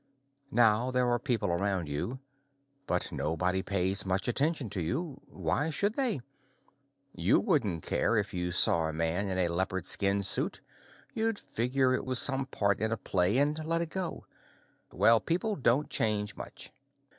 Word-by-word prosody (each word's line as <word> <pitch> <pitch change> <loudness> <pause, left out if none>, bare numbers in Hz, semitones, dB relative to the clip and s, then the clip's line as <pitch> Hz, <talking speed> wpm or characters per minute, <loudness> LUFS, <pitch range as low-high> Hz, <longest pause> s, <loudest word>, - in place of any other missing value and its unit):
Now 120 -1 +2
there 125 -1 0
are 120 0 +1
people 120 - -1
around 95 -1 -1
you, 75 - -4 0.7
but 90 - 0
nobody 90 +4 -2
pays 95 0 0
much 95 0 -2
attention 140 +2 0
to 95 - -3
you. 140 - -4
Why 95 - -2
should 200 +7 -1
they? 240 - -1 0.9
You 90 +4 +2
wouldn't 110 - -1
care 115 - 0
if 105 -1 -2
you 90 -1 -3
saw 85 -2 +5
a 80 - -5
man 85 +5 -2
in 95 - -3
a 90 -1 +1
leopard 95 +1 -2
skin 100 +1 +2
suit; 95 - -2 0.5
you'd 225 -1 -1
figure 130 - -1
it - - -2
was 130 -1 0
some 135 0 +7
part 100 -6 -1
in 110 +2 -1
a 115 - -1
play 95 +3 +1
and 150 +3 0
let 165 +1 0
it 165 -2 -4
go. 185 -3 -5 0.7
Well, 115 0 +4
people 180 - -2
don't 135 0 +1
change 105 -2 0
much. - - -10
110 Hz, 165 wpm, -29 LUFS, 95-140 Hz, 0.9 s, some